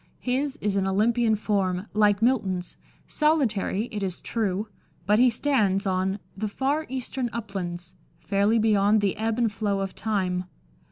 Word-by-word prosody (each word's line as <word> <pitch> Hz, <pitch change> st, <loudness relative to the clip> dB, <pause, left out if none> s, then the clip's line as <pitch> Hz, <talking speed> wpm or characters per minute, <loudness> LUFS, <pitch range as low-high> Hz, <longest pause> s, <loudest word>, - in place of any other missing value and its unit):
His 265 Hz, +2 st, -1 dB
is 205 Hz, -1 st, 0 dB
an 190 Hz, -1 st, +1 dB
Olympian 220 Hz, +3 st, +2 dB
form, 195 Hz, -3 st, -1 dB
like 210 Hz, 0 st, +3 dB
Milton's, 190 Hz, -8 st, 0 dB, 0.3 s
solitary, 245 Hz, -9 st, +1 dB
it 210 Hz, -, -4 dB
is 185 Hz, -2 st, -3 dB
true, 210 Hz, -2 st, -1 dB, 0.4 s
but 210 Hz, +3 st, +3 dB
he 250 Hz, +1 st, +6 dB
stands 215 Hz, -6 st, +1 dB
on 190 Hz, +1 st, 0 dB
" -, -, -36 dB
the 215 Hz, +3 st, -2 dB
far 280 Hz, +8 st, -1 dB
eastern 260 Hz, -1 st, -3 dB
uplands," 180 Hz, -6 st, -5 dB, 0.3 s
fairly 200 Hz, +3 st, +2 dB
beyond 210 Hz, -1 st, +3 dB
the 200 Hz, -2 st, +1 dB
ebb 220 Hz, +1 st, -1 dB
and 235 Hz, -3 st, +2 dB
flow 205 Hz, -2 st, -1 dB
of 195 Hz, -1 st, -3 dB
time. 185 Hz, -4 st, -1 dB
210 Hz, 155 wpm, -26 LUFS, 195-235 Hz, 0.4 s, he